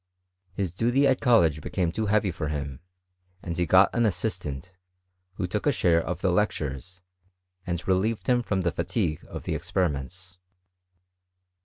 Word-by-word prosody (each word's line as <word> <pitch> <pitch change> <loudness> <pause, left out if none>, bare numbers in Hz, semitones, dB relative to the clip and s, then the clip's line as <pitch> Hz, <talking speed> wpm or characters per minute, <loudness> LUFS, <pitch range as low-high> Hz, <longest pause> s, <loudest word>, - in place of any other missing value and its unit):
His 90 -3 -2
duty 120 +8 +2
at 130 -1 +3
(Dollege 85 - +3
became 85 +1 -1
too 110 +4 -2
heavy 105 -2 +2
for 80 -2 -4
him, 70 -2 -4 0.6
and 85 -2 -4
he 85 0 0
got 95 +4 +5
an 120 - +1
aatistant, 90 -8 -2 0.6
who 90 - -2
took 105 +8 -2
a - - +5
share 85 -9 +3
of 90 - -4
the 95 - +2
lectures, 90 -2 -2 0.7
and 85 -1 -3
re* 95 - +4
lieved 105 +4 -1
him 125 -1 +3
from 100 -5 -1
the 85 -1 0
fatigue 85 -5 -2
of - - -7
the - - -2
experiments. 90 +3 -3
90 Hz, 160 wpm, -26 LUFS, 85-105 Hz, 0.7 s, got